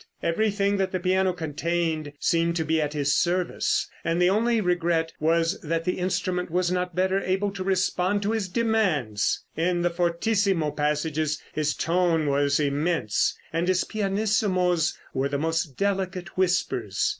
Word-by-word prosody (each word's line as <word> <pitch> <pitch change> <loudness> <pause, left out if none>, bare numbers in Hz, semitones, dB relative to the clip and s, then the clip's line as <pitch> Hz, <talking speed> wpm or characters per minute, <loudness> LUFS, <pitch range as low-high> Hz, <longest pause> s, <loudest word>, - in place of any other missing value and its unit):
Everything 200 +2 +1
that 190 -1 0
the 185 - -1
piano 185 +1 +2
contained 160 -1 -2
seemed 170 0 +1
to 160 -2 -1
be 160 0 +1
at 150 0 -2
his 145 -1 +1
service, 180 0 0 0.2
and 165 +1 0
the 180 +1 +4
only 230 +3 +2
regret 170 -3 0
was 165 +3 +1
that 165 +1 -2
the 180 - -1
instrument 180 0 -1
was 180 +1 0
not 180 -1 -2
better 190 +1 +1
able 195 +2 0
to 195 -1 -5
respond 185 +1 +1
to 205 - 0
his 220 -4 -1
demand. 180 - 0 0.3
In 175 +1 0
the 175 - +2
fortissimo 175 -1 +1
passages 150 0 -1
his 150 -1 0
tone 165 -2 +1
was 140 0 +2
immense, 145 -5 0 0.2
and 165 +2 0
his 185 -1 +2
pianissimos 195 -5 0 0.2
were 135 +1 0
the 140 - -1
most 160 -2 -1
delicate 190 -2 -2
whispers. 280 - 0
175 Hz, 155 wpm, -25 LUFS, 160-190 Hz, 0.3 s, the